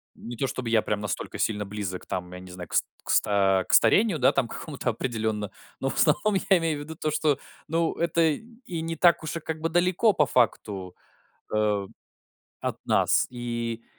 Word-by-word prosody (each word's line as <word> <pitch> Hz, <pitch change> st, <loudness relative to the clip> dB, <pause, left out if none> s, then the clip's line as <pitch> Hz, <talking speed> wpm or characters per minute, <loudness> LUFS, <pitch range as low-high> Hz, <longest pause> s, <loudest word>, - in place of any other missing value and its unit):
Не 120 Hz, -, -8 dB
то 135 Hz, +4 st, -1 dB
чтобы 125 Hz, -2 st, -4 dB
я 115 Hz, -1 st, +4 dB
прям 105 Hz, -1 st, -2 dB
настолько 105 Hz, -3 st, -4 dB
сильно 105 Hz, -2 st, 0 dB
близок 100 Hz, -2 st, -5 dB
там, 90 Hz, -1 st, -4 dB
я 90 Hz, -, -7 dB
не 90 Hz, 0 st, -11 dB
знаю, 90 Hz, -1 st, -8 dB
кс -, -, +2 dB, 0.2 s
кста 95 Hz, -2 st, +2 dB
к -, -, 0 dB
старению, 205 Hz, -6 st, +5 dB
да, 130 Hz, -, +5 dB
там, 135 Hz, -3 st, +1 dB
к -, -, -6 dB
какому-то 140 Hz, -5 st, -3 dB
определенно, 110 Hz, -3 st, -2 dB, 0.3 s
но 135 Hz, -, -1 dB
в -, -, -4 dB
основном 195 Hz, +7 st, +3 dB
я 190 Hz, -, +7 dB
имею 165 Hz, -3 st, -1 dB
в -, -, -6 dB
виду 160 Hz, +2 st, -8 dB
то, 155 Hz, -, -1 dB
что, 150 Hz, -2 st, +1 dB, 0.3 s
ну, 165 Hz, +1 st, +1 dB
это 170 Hz, 0 st, 0 dB
и 185 Hz, -, -3 dB
не 165 Hz, 0 st, -3 dB
так 170 Hz, 0 st, +4 dB
уж 155 Hz, +1 st, -4 dB
и -, -, -4 dB
как 160 Hz, 0 st, -5 dB
бы 165 Hz, -, 0 dB
далеко 180 Hz, +5 st, +3 dB
по 150 Hz, -, +3 dB
факту, 105 Hz, -8 st, 0 dB, 0.6 s
э, 105 Hz, -2 st, +1 dB, 0.7 s
от -, -, -4 dB
нас. -, -, +3 dB
И 120 Hz, -1 st, -4 dB
125 Hz, 195 wpm, -26 LUFS, 105-165 Hz, 0.7 s, я